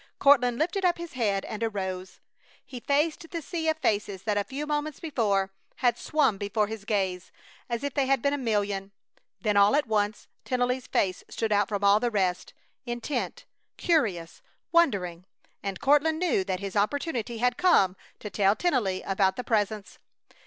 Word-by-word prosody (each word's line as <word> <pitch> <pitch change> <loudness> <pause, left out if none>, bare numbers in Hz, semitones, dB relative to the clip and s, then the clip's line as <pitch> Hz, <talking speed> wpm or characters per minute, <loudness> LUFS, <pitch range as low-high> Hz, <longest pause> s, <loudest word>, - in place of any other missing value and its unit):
Courtland 250 -4 +5
lifted 350 +6 -1
up 355 -1 +3
his 340 -1 -8
head 205 -6 0
and 215 0 -6
arose. 190 -4 -3 0.5
He 255 - -8
faced 305 +5 0
the 335 - -4
sea 325 +1 -2
of 315 - +1
faces 205 - -1
that 210 -2 0
a 205 - +1
few 275 +7 -5
moments 300 0 -2
before 205 - 0 0.2
had 245 -2 +2
swum 270 -8 +1
before 210 +1 0
his 215 -1 -7
gaze 190 -4 -1 0.4
as 235 +2 -2
if 285 -2 -2
they 275 -2 +1
had 270 0 +3
been 280 +4 +1
a - - 0
million. 205 -4 -1 0.5
Then 210 +1 +1
all 200 +6 +6
at 295 - +2
once 210 -2 -1 0.2
Tennelly's 250 0 -1
face 185 -2 0
stood 225 -1 -2
out 205 -1 +2
from 205 -1 -2
all 200 +1 +6
the 240 - 0
rest, 185 -5 -1 0.3
intent, 240 +4 -4 0.3
curious, 205 - 0 0.3
wondering, 190 - +2 0.4
and 195 -1 -4
Courtland 295 +3 +3
knew 330 - +1
that 185 -1 -2
his 195 -1 -5
opportunity 240 +1 -1
had 245 +1 +1
come 200 - +4 0.3
to 210 - -6
tell 200 +1 +3
Tennelly 225 - 0
about 190 -1 +2
the 250 - -4
Presence! 215 -3 -1
220 Hz, 175 wpm, -27 LUFS, 200-280 Hz, 0.5 s, all